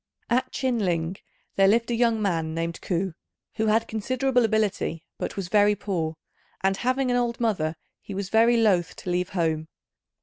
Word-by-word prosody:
At 255 +2 +1
Chin 255 -3 0
ling 175 -2 -1 0.4
there 195 0 +6
lived 230 +3 +3
a - - +1
young 230 -1 +2
man 165 -6 -1
named 165 0 -3
Ku, 180 0 -1 0.4
who 220 - +1
had 225 +2 +2
considerable 250 +3 +1
ability 210 -7 0
but - - -3
was 195 -3 -3
very 205 +2 +4
poor; 170 -6 -2 0.5
and 195 0 +2
having 255 +2 +1
an 245 - +2
old 240 -1 -1
mother, 185 -9 0 0.3
he 200 - -8
was 195 -1 -3
very 230 +2 +4
loth 190 -6 +2
to 180 - -5
leave 180 0 0
home. 160 -3 -1
205 Hz, 175 wpm, -25 LUFS, 175-230 Hz, 0.5 s, there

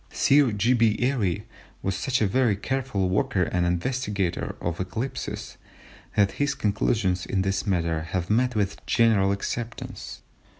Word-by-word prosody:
Sir 140 -3 +4
G. 105 +4 +2
B. 115 -3 +3
Airy 120 -9 0 0.4
was 95 -1 0
such 125 +4 0
a - - +3
very 115 0 +2
careful 120 -3 -1
worker 100 +1 +1
and 90 0 0
investigator 100 0 -1
of 85 -1 -3
eclipses 95 +8 -4 0.6
that 100 -2 +4
his 145 0 +1
conclusions 100 -3 0
in 95 -1 -1
this 95 +1 -1
matter 85 -4 0
have 90 0 -2
met 125 +4 +2
with 100 -2 -1
general 110 -4 +4
acceptance. 115 +4 -5
105 Hz, 140 wpm, -25 LUFS, 95-125 Hz, 0.6 s, Sir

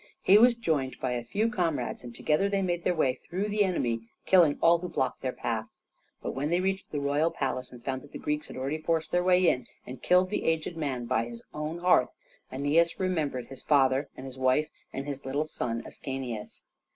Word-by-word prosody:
He 195 - +6
was 240 +1 +6
joined 155 - -1
by 130 - -1
a 120 -1 -2
few 205 - 0
comrades, 170 - -1
and 120 -1 -9
together 160 +6 +1
they 200 -1 +1
made 175 -2 -1
their 180 - +1
way 135 -5 +2
through 195 +4 -3
the 210 0 +3
enemy, 115 - -1 0.2
killing 170 -6 +5
all 170 0 +5
who 180 +1 -5
blocked 130 -5 -1
their 130 - -1
path. 115 -3 -3 0.6
But - - -2
when 140 +3 -2
they 175 +2 +2
reached 190 +1 -2
the 145 - -1
royal 145 +3 +2
palace 130 -4 -3
and 120 -1 -13
found 130 -1 -2
that 145 - -15
the - - -6
Greeks 150 0 -2
had - - -9
already 135 +4 -2
forced 160 0 -1
their 180 0 +2
way 180 0 +4
in 130 -5 +1 0.2
and 125 0 -9
killed 180 +1 +3
the - - -1
aged 165 +1 0
man 135 -6 -2
by 115 -2 +1
his 115 0 -9
own 150 +2 -4
hearth, 175 -7 +4 0.4
Æneas 145 +5 +2
remembered 155 -9 -1
his 135 -1 -10
father 135 -1 +3
and 130 - -8
his 130 -1 -9
wife 130 +4 +2 0.2
and 135 - -5
his 140 -1 -5
little 140 +3 -1
son 115 -6 -3
Ascanius. 130 -6 -6
145 Hz, 215 wpm, -28 LUFS, 130-175 Hz, 0.6 s, He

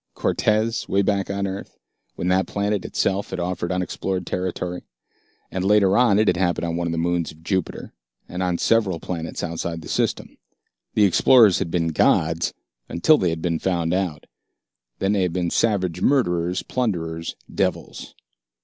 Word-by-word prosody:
Cortez, 110 +2 0
way 100 +1 +2
back 100 -1 0
on 100 0 -1
Earth, 95 +1 -6 0.4
when 90 - -3
that 95 -1 +2
planet 100 -1 -1
itself 100 +1 -1
had 95 - -4
offered 85 0 -2
unexplored 90 0 -2
territory. 90 0 -3 0.7
And 95 - -2
later 100 -1 +4
on 115 -3 +4
it 110 0 +3
had - - +3
happened 85 -2 0
on 85 0 -2
one 85 0 -1
of - - -2
the 85 - -2
moons 85 0 0
of 80 +1 -18
Jupiter, 95 -1 -3 0.3
and 90 - -5
on 90 -2 0
several 100 -6 +2
planets 80 -2 -5
outside 85 -1 -4
the - - -9
System. - - -2 0.6
The 105 - +4
explorers 105 +1 +6
had - - -2
been 85 -1 0
gods, 80 +1 +2 0.4
until 150 - +4
they 90 - +1
had 80 -1 -4
been 85 -2 0
found 85 -3 0
out. 90 -5 -2 0.7
Then 95 - 0
they 100 - +1
had 90 -2 0
been 90 -2 -1
savage 95 -7 0
murderers, 90 -10 +1
plunderers, 85 -9 -2 0.2
devils. - - -3
90 Hz, 165 wpm, -23 LUFS, 85-100 Hz, 0.7 s, explorers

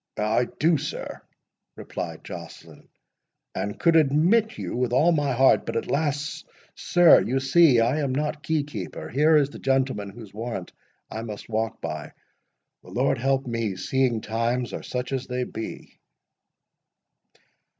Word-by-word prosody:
"I 110 +3 +1
do, 155 +6 +1
sir," - - -6 0.5
replied - - -6
Joceline, - - -10 0.7
"and 105 - -4
could 170 -1 +3
admit 165 +10 +3
you - - -4
with 125 -1 -1
all 155 +7 +4
my 145 -4 +1
heart; 130 +1 +4
but, - - -3
alas! 145 +5 -1 0.3
sir, 175 -2 +5
you 130 +3 0
see 135 -1 +5
I 120 +6 +2
am 140 -3 -1
not 150 +2 -2
key 160 -1 0
keeper—Here 135 - 0
is 145 -2 +2
the - - -10
gentleman 130 -6 0
whose 105 -1 -12
warrant 115 +2 -5 0.4
I 110 - -4
must 110 -3 -7
walk 110 0 -2
by—The - - -11
Lord 135 +1 0
help 135 +1 +1
me, 115 -5 -2
seeing 120 +4 0
times 115 +3 -1
are - - -4
such 125 +1 -4
as 130 -1 -3
they 125 0 -2
be!" 110 -2 -8
130 Hz, 140 wpm, -25 LUFS, 115-150 Hz, 0.7 s, sir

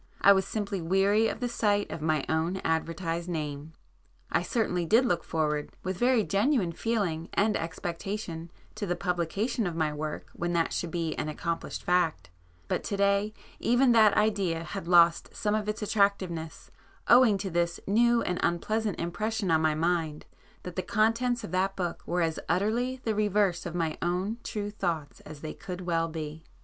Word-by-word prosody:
I 200 - +7
was 190 -1 +1
simply 200 -3 -3
weary 195 +6 +3
of 225 - -4
the 245 - 0
sight 205 -3 0
of 165 - -5
my 155 -2 +1
own 160 +4 0
advertised 165 +1 -1
name. 150 -2 -4 0.6
I - - +2
certainly 200 -7 0
did 225 +10 +4
look 175 -7 +1
forward 150 -2 -1
with 185 -1 -3
very 245 -2 +4
genuine 200 - +1
feeling 175 -5 -1
and 210 +2 +3
expectation 170 +1 -4 0.2
to 205 - -4
the 175 - 0
publication 195 +6 -1
of 170 - -4
my 155 -2 0
work 150 0 -5
when 175 0 -2
that 165 -1 +1
should 175 - -2
be 165 -1 -2
an 155 - -2
accomplished 165 +2 -4
fact,—but 85 - -2
to 200 - -3
day 200 +1 +2 0.3
even 245 +2 +4
that 220 -3 +6
idea 200 -6 +1
had 190 0 -6
lost 170 -1 +4
some 210 -1 0
of 210 -1 -1
its 210 0 -3
attractiveness 190 -6 0 0.4
owing 240 -4 +6
to 195 -1 -4
this 170 0 0
new 235 +3 +3
and 180 0 -2
unpleasant 210 +3 0
impression 195 +3 -1
on 160 -1 +4
my 155 -1 +2
mind 160 -2 -1 0.4
that 180 -1 -7
the 185 - 0
contents 230 +5 +1
of 210 - -6
that 190 +1 0
book 175 -2 -3
were 175 0 +1
as 160 -1 -1
utterly 240 +7 0
the 220 - 0
reverse 205 -4 +1
of 170 - -6
my 165 -3 -1
own 185 +6 -1
true 205 -1 -4
thoughts 170 -8 -3
as 150 -1 -10
they 155 - -5
could 180 -1 -7
well 165 -2 0
be. 155 -1 -6
180 Hz, 175 wpm, -28 LUFS, 165-210 Hz, 0.6 s, I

